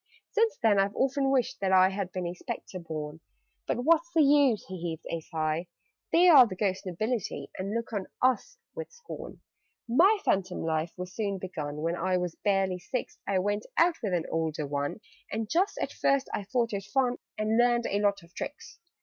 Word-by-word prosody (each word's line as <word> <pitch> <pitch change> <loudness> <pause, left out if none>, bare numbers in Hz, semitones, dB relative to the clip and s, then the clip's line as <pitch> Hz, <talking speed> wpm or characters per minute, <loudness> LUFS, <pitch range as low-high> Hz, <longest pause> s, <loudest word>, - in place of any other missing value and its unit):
"Since 450 -1 +2
then 210 -3 +5
I've 195 +1 +1
often 270 +1 +1
wished 260 -1 +1
that 195 -1 0
I 185 0 +6
Had 195 -1 -3
been 180 -1 -3
a 175 - -3
Spectre 185 +1 -6
born. 155 -2 -6 0.5
But 245 - -1
what's 335 +3 +3
the 320 -3 +5
use?" 280 -6 +4
(He 185 -2 -7
heaved 165 -2 -4
a 165 - -1
sigh). 160 +2 -2 0.4
"They 350 +2 +6
are 280 -8 +9
the 190 - -6
ghost 190 -1 -1
nobility, 215 +6 -3
And 195 +3 -3
look 230 0 -3
on 200 -3 -2
us 260 - +1 0.2
with 485 -1 -7
scorn. 475 -2 -9 0.5
"My 350 - +5
phantom 185 -1 0
life 160 +1 -1
was 180 0 -6
soon 200 -3 -2
begun: 155 -5 -5
When 165 +1 0
I 185 +1 +1
was 180 -2 -2
barely 195 -2 0
six, 245 +7 -5
I 195 - +1
went 205 +3 -1
out 335 0 +4
with 205 -6 -1
an 170 - -1
older 160 -2 -1
one 145 +7 -3 0.3
And 220 0 -2
just 360 - +1
at - - -2
first 275 -1 +1
I 200 - -2
thought 230 +1 0
it 195 -1 -3
fun, 250 +4 +1 0.2
And 215 +2 +1
learned 240 -1 +3
a 200 - 0
lot 200 -2 +1
of 170 +1 -19
tricks. - - -7
200 Hz, 200 wpm, -29 LUFS, 180-255 Hz, 0.5 s, are